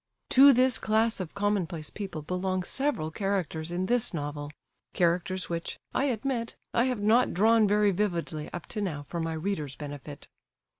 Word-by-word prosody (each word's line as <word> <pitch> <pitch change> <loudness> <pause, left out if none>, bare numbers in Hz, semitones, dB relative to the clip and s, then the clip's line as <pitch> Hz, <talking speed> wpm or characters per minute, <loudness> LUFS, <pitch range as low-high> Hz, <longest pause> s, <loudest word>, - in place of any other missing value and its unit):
To 275 +2 +9
this 255 -2 +3
class 220 +1 +1
of 185 -2 -6
commonplace 195 -6 -1
people 190 -7 -6
belong 185 +3 -1
several 265 - -1
characters 180 -4 -2
in 180 +2 -1
this 240 -2 +1
novel;—characters 165 +5 -2
which—I 170 +10 -3
admit—I 235 -1 -1
have 250 -5 -1
not 225 +2 +3
drawn 220 +3 +5
very 205 0 +3
vividly 170 -6 -2
up 175 - -6
to 215 - -2
now 155 -8 -3
for 170 +4 -5
my 165 0 -2
reader's 155 -4 -3
benefit. 145 0 -8
185 Hz, 145 wpm, -28 LUFS, 160-220 Hz, -, To